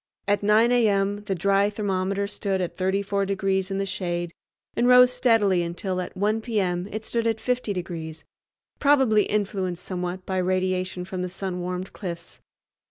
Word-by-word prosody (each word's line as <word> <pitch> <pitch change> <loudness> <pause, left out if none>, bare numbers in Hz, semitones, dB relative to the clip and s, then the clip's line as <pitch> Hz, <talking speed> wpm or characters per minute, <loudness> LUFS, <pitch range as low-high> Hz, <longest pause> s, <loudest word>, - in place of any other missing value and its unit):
At 205 0 +2
9 215 +3 +4
a.m. 205 -3 +2
the 195 - -1
dry 200 +3 +2
thermometer 200 -1 -1
stood 200 -1 -2
at 180 -2 -3
34 195 +1 0
degrees 190 -1 0
in 195 - -2
the 195 - 0
shade 175 -3 -3 0.4
and 240 - +2
rose 250 0 +7
steadily 225 -7 +3
until 180 +2 -2
at 180 - -7
1 210 +3 +1
p.m. 190 -6 -1
it 215 +1 -5
stood 230 -1 -1
at 225 -1 0
50 250 -3 -1
degrees, 165 -4 -5 0.6
probably 265 -7 +4
influenced 195 -4 -2
somewhat 180 0 -4
by 190 - -2
radiation 185 0 -1
from 185 0 -5
the 180 - -2
sun 185 0 -4
warmed 180 +1 -4
cliffs. 170 -3 -7
195 Hz, 165 wpm, -25 LUFS, 185-210 Hz, 0.6 s, rose